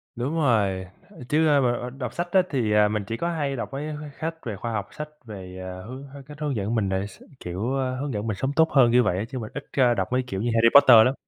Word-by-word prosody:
Đúng 130 +7 -2
rồi, 105 - +1 0.2
ơ, - - -15
chứ, 155 +1 +3
ơ, 145 -2 +4
ờ, 120 - -2
ờ, 125 - -4
đọc 125 -2 -6
sách 175 0 -4
á 190 - +5
thì, 120 -7 0
à, 105 0 +5
mình 105 -1 -2
chỉ 115 - -3
có 170 - -1
hay 145 -5 -2
đọc 120 - -4
mấy, 145 +3 -4
ơ, 155 - -5
mấy 150 - -8
khách 160 0 -6
về 110 -3 -3
khoa 115 +4 -5
học, 100 -2 -3
sách 150 0 -7 0.2
về, 95 -4 -9
à, 95 0 -7
hướng 130 +3 -8
h 140 +1 -12
cách 150 0 -11
hướng 145 -4 -1
dẫn 105 +3 -2
mình 100 -4 0
đề 95 +1 -1
s 95 - -16 0.2
kiểu, 95 +9 -3
ơ, 130 -1 -1
hướng 140 -3 -3
dẫn 105 +2 -3
mình 105 -3 -2
sống 135 +5 -2
tốt 160 +1 +4
hơn 125 -4 +5
như 125 0 +5
vậy 90 - 0
á, 100 - -1
chứ 130 -2 -5
mình 110 - -7
ít 145 - -6
ra 125 -3 +4
đọc 95 -4 -1
mấy 130 0 +1
kiểu 95 -2 -3
như 120 - -1
Harry 115 0 +5
Potter 120 -5 +9
lắm. 130 - +2
120 Hz, 305 wpm, -25 LUFS, 105-140 Hz, 0.2 s, Potter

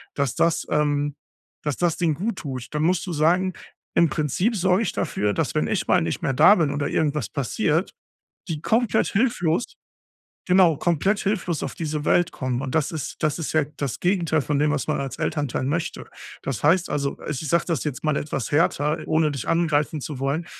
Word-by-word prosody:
dass 140 -4 -1
das, 170 0 +1
ähm 145 -1 +1 0.5
dass 150 -2 -2
das 175 -2 +1
denen 165 -4 +1
guttut, 145 - -4
dann 150 - -1
musst 180 +2 +1
du 175 - -4
sagen, 175 +5 +2 0.4
im 170 -2 +4
Prinzip 170 - 0
sorge 185 +2 +2
ich - - -2
dafür, 105 -10 -1
dass - - -1
wenn - - +1
ich - - -1
mal - - +4
nicht 80 0 -3
mehr 135 - +1
da 155 +10 +7
bin 155 -5 +1
oder 145 -1 -1
irgendwas 150 -1 0
passiert, 155 - 0 0.6
die 155 -3 -4
komplett 225 +1 +2
hilflos 195 -4 0 0.7
genau, 180 -4 +5
komplett 175 +6 +1
hilflos 185 -5 -1
auf - - -4
diese 155 -2 -3
Welt 175 -1 +3
kommen. 130 -1 -2
Und 130 0 -4
das 160 +1 +1
ist 155 - -5
das 155 0 0
ist 160 - -3
ja 155 -2 +4
das 140 -5 -3
Gegenteil 170 -5 +1
von 145 0 -1
dem, 150 0 +2
was 145 - -1
man 150 - 0
als 135 -1 -4
Elternteil 145 -5 -1
möchte. 160 +5 -2 0.4
Das 135 -6 -4
heißt, 170 +4 +3
also, 140 -1 -1
i - - -5
ich 150 +1 -3
sag 170 - +2
das 165 -7 -1
jetzt 150 0 -4
mal 155 -2 +1
etwas 140 -5 -4
härter, 150 0 +2
ohne 155 -1 +2
dich 135 -6 -5
angreifen 155 -3 +1
zu 145 -4 -5
wollen. 140 +6 -1
155 Hz, 200 wpm, -24 LUFS, 145-175 Hz, 0.7 s, da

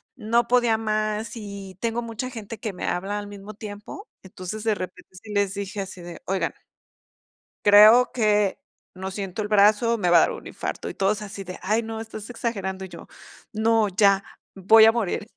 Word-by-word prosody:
no 235 0 +1
podía 240 -2 +3
más, 215 0 -2
y 200 -3 -8
tengo 230 0 -1
mucha 230 +2 -5
gente 225 -2 -8
que 215 -1 -4
me 180 - -5
habla 195 +3 -2
al 205 - -7
mismo 205 +1 -10
tiempo. 210 - -9 0.2
Entonces, 190 +3 -7
de 220 -1 +2
repente 185 -1 -8
sí 210 - -9
les 200 -1 +1
dije 200 0 -4
así 190 -2 -8
de: 175 0 -10
"Oigan" 190 0 -1 1.1
"creo 215 +5 +8
que 210 -4 +2 0.3
no 190 +1 -6
siento 195 +1 -4
el 205 - -3
brazo, 210 +3 +4
me 180 -5 0
va 175 - +7
a - - +8
dar - - +2
un - - -8
infarto". - - -5
Y - - -6
todos 200 +1 0
así 200 -1 -7
de: 180 -1 -8
"Ay, 215 +5 0
no, 225 0 -5
estás 220 -1 -9
exagerando". 195 -6 -4
Y - - -11
yo: - - -11 0.5
"No, 220 0 +2
ya, 195 0 +3 0.3
voy 220 +4 +7
a 225 - +7
morir". 220 -2 -2
210 Hz, 190 wpm, -24 LUFS, 195-225 Hz, 1.1 s, creo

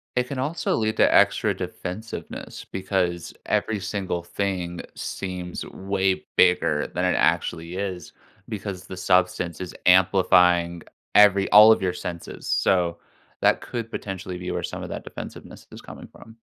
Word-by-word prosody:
It 125 0 +1
can 140 - -5
also 145 +6 -1
lead 110 0 -1
to - - +4
extra - - +3
defensiveness 110 +6 -7
because 95 -3 -2
every 110 -2 0
single 95 -2 -3
thing 90 -1 -3
seems 90 -2 -5
way 95 -1 -1
bigger 85 -4 +3
than 90 - -3
it 90 - +2
actually 85 +1 0
is 95 -4 -5 0.3
because 100 -4 -6
the 95 - -8
substance 90 -2 +1
is 90 -1 -6
amplifying 90 -2 +4 0.3
every 100 -1 +6
all 105 +1 +9
of 110 - +3
your 90 -2 0
senses. 85 -1 -7
So 85 -2 +1 0.4
that - - +3
could 115 -2 -5
potentially 95 -4 -6
be 90 0 -5
where - - -2
some - - -5
of - - -7
that - - -6
defensiveness - - -10
is - - -10
coming - - -11
from. 110 - -16
95 Hz, 150 wpm, -24 LUFS, 90-100 Hz, 0.4 s, all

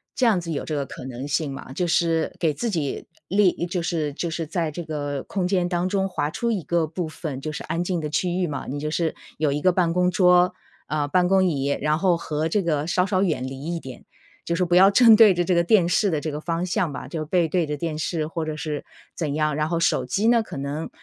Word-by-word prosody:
这 260 - +2
样 215 -6 +4
子 165 -1 -5
有 145 - -3
这 155 - -3
个 140 -1 -1
可 125 - -9
能 130 +2 -6
性 145 0 -1
吗？ 135 -1 -8
就 180 - -1
是 165 -1 +1
给 160 -3 +1
自 235 +9 -2
己 160 -9 -3 0.2
立 190 -3 +2
就 175 -1 -2
是 160 -4 -2
就 170 +4 -3
是 165 0 -3
在 165 -1 -2
这 175 +3 -6
个 145 -3 -4
空 185 -3 -2
间 180 -2 +1
当 175 0 0
中 195 -1 0
划 150 -5 -1
出 235 +5 -1
一 200 -6 -2
个 165 +1 0
部 170 +1 -4
分 155 -4 -6
就 155 - -4
是 150 - -6
安 165 +3 -2
静 175 -1 -1
的 150 - -3
区 175 +4 0
域 180 - +1
嘛， 140 -4 -5
你 145 +2 -4
就 150 +1 -3
是 160 0 -1 0.2
有 150 -2 +1
一 145 +1 -2
个 185 - +4
办 175 -2 +1
公 180 0 +2
桌， 180 -1 +4 0.3
啊， 150 -1 -1
办 180 +4 +2
公 190 0 +4
椅， 140 -5 0
然 150 +2 +1
后 180 -2 +3
和 155 0 -2
这 205 +3 +1
个 155 -2 0
稍 180 +1 +2
稍 190 -1 +1
远 155 -8 0
离 135 +1 -7
一 - - -3
点， 130 -5 -10 0.4
就 170 - -1
是 180 +1 +1
不 175 - +1
要 190 +2 +8
正 225 +1 +7
对 215 -3 +7
着 175 0 0
这 185 - +1
个 170 - +3
电 175 -1 +4
视 200 +2 +2
的 155 - 0
这 155 - -3
个 150 - -5
方 170 +2 -2
向 175 -2 0
吧， - - -7
就 160 -2 -4
背 170 +1 +2
对 170 0 +1
着 150 0 -3
电 160 0 -3
视 155 0 -1
或 165 0 -4
者 155 -1 -3
是 150 -1 -4 0.3
怎 150 -4 -2
样。 155 -1 +1
然 155 0 -1
后 170 -1 0
手 165 - +1
机 215 +3 0
呢， 235 -1 +5
可 - - -8
能， 140 +3 -4
165 Hz, 285 characters per minute, -24 LUFS, 150-180 Hz, 0.4 s, 要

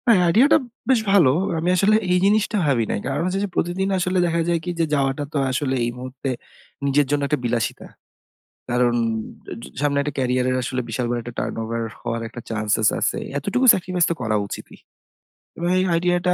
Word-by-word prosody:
হ্যাঁ, 220 -6 +6
আইডিয়াটা 235 - +5 0.3
বেশ 260 -3 +5
ভালো। 185 -9 +6 0.3
আমি 170 +2 0
আসলে 200 +4 +4 0.2
এই 180 - +4
জিনিসটা 210 +1 +2
ভাবি 130 -6 +2
নাই। - - -1
কারণ 140 +4 -1
হচ্ছে 185 +1 -1
যে, - - -7
প্রতিদিন 180 +3 0
আসলে 185 +1 0
দেখা 170 -1 +1
যায় 170 -1 +2
কি 180 - -4
যে, 165 - +3
যাওয়াটা 135 0 +1
তো - - 0
আসলে 130 0 -1
এই 120 - -1
মুহূর্তে 130 +1 -5 0.6
নিজের 140 +1 +3
জন্য 145 0 +1
একটা 150 +1 0
বিলাসিতা। 120 -1 -2 0.8
কারণ 120 0 +2 0.7
ঝ - - -6 0.2
সামনে 145 -1 +1
একটা 145 0 -3
ক্যারিয়ারের 130 0 +1
আসলে 125 +1 -2
বিশাল 120 +2 -2 0.2
একটা 120 +1 -8
টার্নওভার 115 +1 -3 0.2
হওয়ার 115 0 -3
একটা 120 +1 -9
চান্সসেস 110 -1 +1
আছে। - - 0 0.2
এতটুকু 200 - 0
স্যাক্রিফাইস 180 -1 0
তো - - +1
করা 110 -3 0
উচিতই। - - -9 0.8
এবং 170 - -2
এই - - +2
আইডিয়াটা 175 +1 +2
145 Hz, 180 wpm, -22 LUFS, 125-180 Hz, 0.8 s, হ্যাঁ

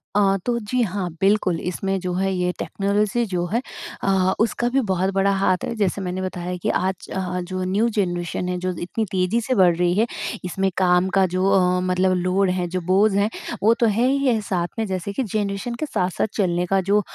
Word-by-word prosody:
अ, 195 -1 +4
तो 240 -1 +1
जी, 240 +3 -1
हाँ, 190 -3 -2
बिल्कुल, 195 -3 +2
इसमें 195 +2 -2
जो 180 -1 -3
है 190 +1 0
ये 180 0 0
टेक्नोलॉज़ी 205 +3 0
जो 180 -4 -2
है 235 - +2 0.4
अ, 190 -1 +2
उसका 235 +2 +1
भी 270 +2 +2
बहुत 190 +1 0
बड़ा 195 +1 +2
हाथ 190 -2 +1
है, - - -2
जैसे 200 -2 0
मैंने 185 0 -3
बताया 180 -1 -4
कि - - +1
आज 190 0 -1 0.4
जो 185 0 -3
न्यू 200 +5 +1
जनरेशन 175 -1 -2
है 180 - -1
जो 185 +1 -1
इतनी 200 +6 -2
तेज़ी 190 +4 +1
से 255 +3 -1
बढ़ 180 -3 +5
रही 175 +1 +1
है, 225 - +4 0.4
इसमें 190 +2 0
काम 180 0 +3
का 190 - +5
जो 185 +1 +1
अ, 180 -2 +3
मतलब 185 +1 +2
लोड 185 +2 +1
है 180 -1 -1
जो 180 +1 -3
बोझ 205 +3 +4
है 200 +1 +2 0.3
वो 220 +2 +6
तो 235 - +1
है 225 +3 +2
ही 275 +1 +1
है। 240 -4 +3
साथ 180 -4 -1
में 225 - +1
जैसे 185 +1 -3
कि 265 - -1
जनरेशन 210 +2 -2
के 275 - -3
साथ-साथ 185 - -1
चलने 180 -3 +1
का 195 +2 +2
जो 210 +1 +5
190 Hz, 215 wpm, -22 LUFS, 180-210 Hz, 0.4 s, वो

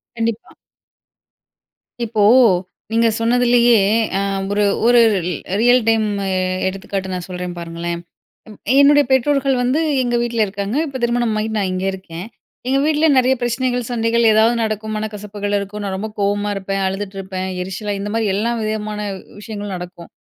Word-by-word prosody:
கண்டிப்பா. 230 -1 -3 1.5
இப்போ, 215 -2 0 0.7
நீங்க 230 0 +3
சொன்னதிலயே 240 -1 +4 0.4
அ - - 0 0.3
ஒரு 205 0 +2 0.2
ஒரு 240 0 +6 0.3
ரி 180 - -1 0.3
ரியல் 245 +1 +5
டைம்மு 210 -3 0 0.4
எடுத்துக்காட்டு, 190 0 -4
நான் 180 -1 -4
சொல்றேன் 180 -1 -5
பாருங்களேன். 170 0 -4 0.5
ம் 210 - -13 0.2
என்னுடைய 290 +1 +6
பெற்றோர்கள் 275 0 +2
வந்து, 260 +6 +1 0.2
எங்க 240 -1 0
வீட்ல 235 -1 -2
இருக்காங்க. 200 +5 -4
இப்ப 270 -2 -6
திருமணம் 235 -2 0
ஆயிட் 220 0 -3
நான் 190 -2 0
இங்க 185 +1 -3
இருக்கேன். 185 -1 -8 0.4
எங்க 270 - +2
வீட்ல 310 +1 +2
நிறைய 255 +1 +3
பிரச்சனைகள், 245 +1 0
சண்டைகள் 230 0 +1
ஏதாவது 220 +2 +4
நடக்கும். 215 0 -3
மனக்கசப்புகள் 210 -1 -3
இருக்கும். 200 +1 -6
நான் 190 -1 -3
ரொம்ப 215 +3 -4
கோவமா 205 +1 0
இருப்பேன், 195 0 -2
அழுதுட்டு 195 +1 -4
இருப்பேன், 190 -1 -4
எரிச்சலா 200 +3 -4
இந்த 205 +1 -4
மாரி, 225 -1 0
எல்லா 220 +4 0
விதமான 215 -1 -3 0.4
விஷயங்களும் 205 -2 -6
நடக்கும். 175 -1 -9
215 Hz, 145 wpm, -19 LUFS, 195-235 Hz, 1.5 s, ஒரு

